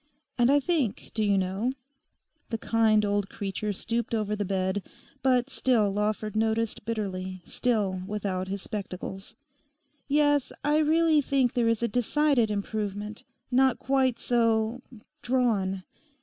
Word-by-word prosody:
And 240 Hz, +1 st, +5 dB
I 285 Hz, +1 st, +5 dB
think, 285 Hz, -, -1 dB
do 220 Hz, -, 0 dB
you 200 Hz, -1 st, +3 dB
know' 190 Hz, +6 st, 0 dB, 0.8 s
(the 225 Hz, -, -1 dB
kind 220 Hz, -1 st, +3 dB
old 205 Hz, -1 st, 0 dB
creature 205 Hz, +1 st, -3 dB
stooped 230 Hz, +3 st, -2 dB
over 210 Hz, -1 st, -1 dB
the 205 Hz, -, -2 dB
bed, 190 Hz, 0 st, -1 dB, 0.4 s
but 250 Hz, -2 st, +3 dB
still, 240 Hz, -6 st, +2 dB
Lawford 210 Hz, +1 st, -1 dB
noticed 220 Hz, 0 st, 0 dB
bitterly, 190 Hz, -5 st, -4 dB
still 205 Hz, -7 st, 0 dB
without 195 Hz, -3 st, -2 dB
his 195 Hz, 0 st, -4 dB
spectacles)—'yes, 235 Hz, +8 st, -3 dB
I 295 Hz, +1 st, +3 dB
really 315 Hz, 0 st, +4 dB
think 265 Hz, -3 st, +1 dB
there 240 Hz, -2 st, +2 dB
is 230 Hz, 0 st, 0 dB
a -, -, +3 dB
decided 245 Hz, +1 st, +2 dB
improvement. 210 Hz, 0 st, -3 dB, 0.3 s
Not 260 Hz, -1 st, +4 dB
quite 265 Hz, -2 st, +1 dB
so—drawn. 230 Hz, -3 st, 0 dB
220 Hz, 125 wpm, -27 LUFS, 205-250 Hz, 0.8 s, And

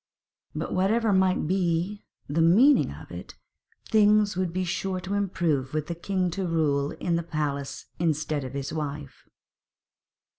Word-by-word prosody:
But -, -, -3 dB
whatever 210 Hz, +4 st, +2 dB
might 190 Hz, -2 st, +2 dB
be 180 Hz, +3 st, -1 dB, 0.2 s
the 150 Hz, +4 st, 0 dB
meaning 225 Hz, -, +5 dB
of 75 Hz, +3 st, -11 dB
it, 85 Hz, +1 st, -9 dB, 0.5 s
things 210 Hz, -2 st, +4 dB
would 185 Hz, -2 st, -1 dB
be 185 Hz, +2 st, -1 dB
sure 185 Hz, +1 st, -2 dB
to 185 Hz, +2 st, -5 dB
improve 165 Hz, -9 st, 0 dB
with 155 Hz, -1 st, -1 dB
the 170 Hz, -, -4 dB
king 180 Hz, +1 st, -1 dB
to 190 Hz, +1 st, -2 dB
rule 145 Hz, -4 st, +1 dB
in 170 Hz, -2 st, -1 dB
the -, -, -1 dB
palace 145 Hz, -4 st, -3 dB
instead 155 Hz, -3 st, 0 dB
of 130 Hz, 0 st, -7 dB
his 140 Hz, +1 st, -4 dB
wife. 145 Hz, -4 st, -6 dB
170 Hz, 150 wpm, -26 LUFS, 150-190 Hz, 0.5 s, meaning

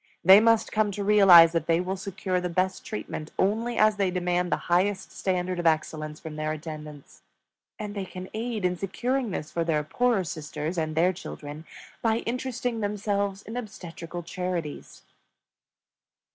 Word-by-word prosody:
They 190 Hz, +3 st, +10 dB
must 230 Hz, 0 st, +3 dB
come 215 Hz, -1 st, +2 dB
to 200 Hz, -, -3 dB
realize 195 Hz, -5 st, +8 dB
that 165 Hz, -2 st, -1 dB
they 165 Hz, 0 st, +3 dB
will 185 Hz, +2 st, -2 dB
secure 190 Hz, -1 st, -3 dB
the 180 Hz, -, -2 dB
best 185 Hz, +2 st, -1 dB
treatment 160 Hz, -7 st, -6 dB
only 225 Hz, +5 st, 0 dB
as 215 Hz, -1 st, +4 dB
they 195 Hz, -2 st, +2 dB
demand 180 Hz, 0 st, 0 dB
the -, -, +4 dB
highest 190 Hz, +3 st, +1 dB
standard 180 Hz, -1 st, -1 dB
of 170 Hz, -, +1 dB
excellence 155 Hz, -1 st, -1 dB
from 155 Hz, -1 st, -8 dB
their 155 Hz, 0 st, -1 dB
attendants; 150 Hz, -2 st, -9 dB, 0.6 s
and 210 Hz, -1 st, -5 dB
they 200 Hz, -2 st, -4 dB
can 185 Hz, 0 st, -8 dB
aid 220 Hz, -2 st, -3 dB
in 180 Hz, 0 st, +1 dB
securing 245 Hz, +7 st, -2 dB
this 155 Hz, -5 st, -5 dB
for 170 Hz, -, 0 dB
their 155 Hz, -2 st, 0 dB
poorer 235 Hz, +5 st, +1 dB
sisters 155 Hz, +1 st, -4 dB
and 155 Hz, -2 st, -2 dB
their 175 Hz, +3 st, +3 dB
children 155 Hz, -3 st, -8 dB, 0.4 s
by 225 Hz, 0 st, +1 dB
interesting 245 Hz, -1 st, -2 dB
themselves 200 Hz, -1 st, -1 dB
in 225 Hz, -, -8 dB
obstetrical 175 Hz, -7 st, -7 dB
charities. 175 Hz, -3 st, -5 dB
185 Hz, 160 wpm, -27 LUFS, 165-210 Hz, 0.6 s, They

